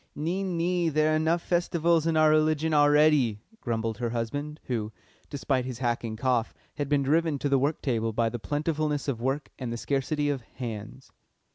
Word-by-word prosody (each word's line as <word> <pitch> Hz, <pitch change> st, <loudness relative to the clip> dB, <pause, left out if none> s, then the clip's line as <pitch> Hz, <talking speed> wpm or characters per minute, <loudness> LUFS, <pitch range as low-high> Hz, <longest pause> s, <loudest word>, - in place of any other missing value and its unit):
"Nee, 170 Hz, +6 st, -2 dB
nee; 175 Hz, -2 st, 0 dB
there 155 Hz, 0 st, +2 dB
are -, -, +3 dB
enough 165 Hz, +2 st, +1 dB
Festivals 170 Hz, -2 st, +1 dB
in 160 Hz, -1 st, +1 dB
our 155 Hz, 0 st, +5 dB
religion 155 Hz, 0 st, +2 dB
already," 145 Hz, -6 st, +4 dB, 0.2 s
grumbled 115 Hz, -2 st, -2 dB
her 120 Hz, -1 st, -1 dB
husband, 145 Hz, +7 st, -4 dB
who, 110 Hz, -4 st, -3 dB, 0.4 s
despite 135 Hz, -2 st, -1 dB
his 125 Hz, -2 st, -5 dB
hacking 120 Hz, -2 st, -2 dB
cough, 120 Hz, -1 st, 0 dB, 0.2 s
had 145 Hz, -2 st, -2 dB
been 145 Hz, -1 st, +2 dB
driven 155 Hz, +2 st, +2 dB
to 145 Hz, -, -2 dB
the 135 Hz, -1 st, +3 dB
work 145 Hz, +4 st, -1 dB
table 115 Hz, -4 st, 0 dB
by 115 Hz, +1 st, +1 dB
the 120 Hz, +1 st, -4 dB
plentifulness 150 Hz, +2 st, -1 dB
of 125 Hz, -5 st, -2 dB
work 135 Hz, +4 st, -1 dB
and 125 Hz, -3 st, -4 dB
the 120 Hz, -, -3 dB
scarcity 145 Hz, +3 st, -1 dB
of 140 Hz, -3 st, -1 dB
"hands." 115 Hz, +1 st, -8 dB
145 Hz, 180 wpm, -27 LUFS, 120-155 Hz, 0.4 s, our